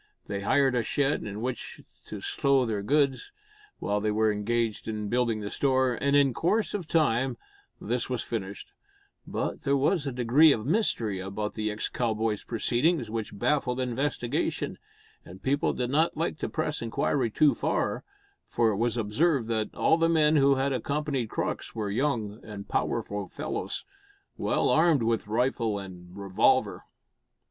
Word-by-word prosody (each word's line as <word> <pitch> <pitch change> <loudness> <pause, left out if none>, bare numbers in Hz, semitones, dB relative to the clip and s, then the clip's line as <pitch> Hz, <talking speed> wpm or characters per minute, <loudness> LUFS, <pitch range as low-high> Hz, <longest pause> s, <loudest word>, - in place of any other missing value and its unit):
They 100 -1 -4
hired 135 +6 +3
a 125 - +2
shed 145 +5 0
in 105 0 -6
which 125 +1 -4 0.3
to - - -7
stow 135 -2 +2
their 110 -3 -2
goods, 140 +3 +1 0.5
while 105 0 -1
they 105 - 0
were 110 +1 +2
engaged 110 +1 -1
in 105 -2 -3
building 120 -3 0
a 100 - -5
store, 130 -2 +2
and 140 +3 +1
in 140 -3 +4
course 210 - 0
of 190 -6 -3
time 135 -6 +1 0.4
this - - -2
was - - -2
finished; 410 -1 -5 0.6
but - - -3
there 140 -1 +2
was 145 +2 +1
a - - -1
degree 125 +6 +5
of 110 -3 -4
mystery 125 - +1
about 100 +3 -4
the 110 -1 -2
ex 105 +1 -3
cowboy's 110 -3 -1
proceedings 120 +2 0
which 110 -2 -4
baffled 130 +1 0
investigation, 125 0 -2 0.4
and 95 +1 -13
people 140 +2 +1
did 125 0 -2
not 155 +3 +2
like 165 -1 -2
to - - -2
press 155 -1 -2
inquiry 115 +2 0
too 145 +6 +4
far; - - -1 0.4
for 115 -1 +2
it 100 - -2
was 120 +2 0
observed 120 +4 +1
that 110 -2 -1
all 160 - +3
the 165 0 +3
men 155 -2 +4
who 140 -1 +5
had 135 +1 0
accompanied 140 -1 -2
Crux - - -3
were 105 -3 -2
young 110 -4 -1
and 105 -2 -8
powerful 100 -1 -2
fellows, - - -4 0.5
well - - 0
armed 155 -5 +4
with 115 -2 0
rifle 115 -1 0
and 90 -2 -10
revolver. 100 -2 +1
120 Hz, 160 wpm, -28 LUFS, 110-145 Hz, 0.6 s, degree